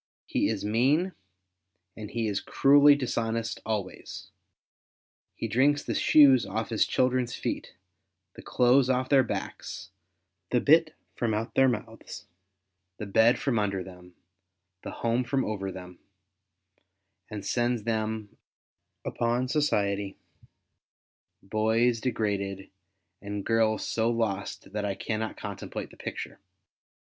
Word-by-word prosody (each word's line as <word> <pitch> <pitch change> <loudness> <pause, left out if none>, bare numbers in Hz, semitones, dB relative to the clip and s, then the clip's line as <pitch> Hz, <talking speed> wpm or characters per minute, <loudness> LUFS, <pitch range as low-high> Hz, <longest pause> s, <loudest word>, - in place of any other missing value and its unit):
He - - 0
is - - -3
mean, 140 - +2 0.8
and 105 -2 -8
he 115 -1 -2
is 100 -2 -1
cruelly 145 +4 +5
dishonest 115 -4 -2
always. 105 -4 -5 1.0
He 115 - -3
driirks 140 +6 +2
the - - -2
shoes 135 -6 +6
off 110 +3 -3
his 110 -2 +2
children's 125 -2 +1
feet, - - -4 0.6
the - - -11
clothes 125 +1 +3
off 130 0 +1
theu* 135 -2 +7
backs, 100 -5 -5 0.6
the 125 - +2
bit 155 +3 +4 0.2
from 115 -3 -1
out 110 +2 -3
their 135 0 +5
mouths, 110 -4 -6 0.7
the 105 - -5
bed 110 +5 +4
from 125 -5 0
under 100 -3 -1
them, 90 -1 -14 0.7
the - - -7
home 120 +2 -1
from 135 +2 -1
over 95 -3 -3
them, 90 -1 -10 1.3
and 105 -2 -6
sends 120 -1 0
them 110 -1 -3 0.7
upon 120 +2 -1
society, 100 -9 0 1.3
boys 110 +3 +1
degraded, 100 -5 -2 0.5
and 100 -1 -5
guis 110 -1 +2
so 115 0 0
lost 105 -5 -3
that 105 -1 -2
I 100 -1 -2
cannot 110 +2 -3
contemplate - - -6
the - - -15
picture. - - -6
115 Hz, 120 wpm, -28 LUFS, 105-125 Hz, 1.3 s, theu